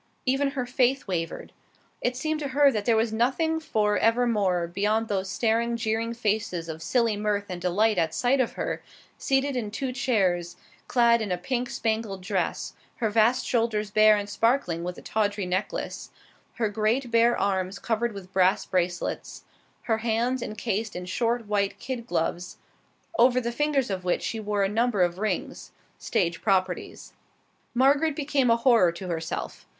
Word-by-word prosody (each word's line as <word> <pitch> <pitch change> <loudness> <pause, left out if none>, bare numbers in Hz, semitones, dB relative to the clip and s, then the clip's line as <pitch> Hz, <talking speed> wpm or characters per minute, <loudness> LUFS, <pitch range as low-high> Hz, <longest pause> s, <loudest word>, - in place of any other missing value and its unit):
Even 270 +2 +2
her 250 - 0
faith 255 +1 +1
wavered. 165 -4 -4 0.5
It 245 0 -1
seemed 310 +3 -1
to 290 - -3
her 280 +1 +4
that 210 -4 -3
there 230 - +4
was 220 0 +1
nothing 270 +8 +1
for 210 -9 0
evermore 215 -7 +2
beyond 210 +6 0
those 190 -2 -1
staring, 230 +3 0
jeering 225 +1 -1
faces 210 -6 -1
of 160 0 -6
silly 230 +2 +1
mirth 205 -1 -1
and 180 -1 -5
delight 200 +3 +2
at 160 -1 0
sight 245 +10 +2
of 240 - -1
her, - - -3 0.4
seated 270 0 +1
in 230 -4 -2
two 255 +5 -3
chairs, 190 -10 0 0.3
clad 235 -2 +4
in 210 -3 -3
a 180 - +1
pink 245 +7 -2
spangled 220 -4 -2
dress, 185 -4 -2 0.2
her 220 -3 -1
vast 230 +4 +3
shoulders 220 -3 0
bare 215 0 +6
and 205 0 -3
sparkling 205 -6 0
with 180 0 -5
a - - -11
tawdry 205 -2 -1
necklace, 190 - -3 0.4
her 225 - 0
great, 220 +4 0
bare 235 +1 +4
arms 190 -1 -1
covered 235 +2 -1
with 195 -2 -10
brass 185 0 +3
bracelets, 180 -1 -2 0.4
her 225 -1 0
hands 235 +3 0
incased 215 0 -3
in 180 0 -5
short, 230 +5 -1
white 205 -1 0
kid 250 -3 -5
gloves, 175 -2 -2 0.6
over 250 +1 +5
the 235 -1 -2
fingers 275 -2 0
of 185 -1 -3
which 180 - 0
she 225 - -3
wore 210 -1 0
a - - +3
number 220 -1 +1
of 175 +1 -1
rings 215 0 -3 0.3
stage 175 -7 -1
properties. 185 -3 -1 0.6
Margaret 280 +4 +3
became 280 -4 +1
a 230 - +5
horror 230 -7 +4
to 185 +2 -7
herself. 165 -2 -5
220 Hz, 165 wpm, -26 LUFS, 190-245 Hz, 0.6 s, bare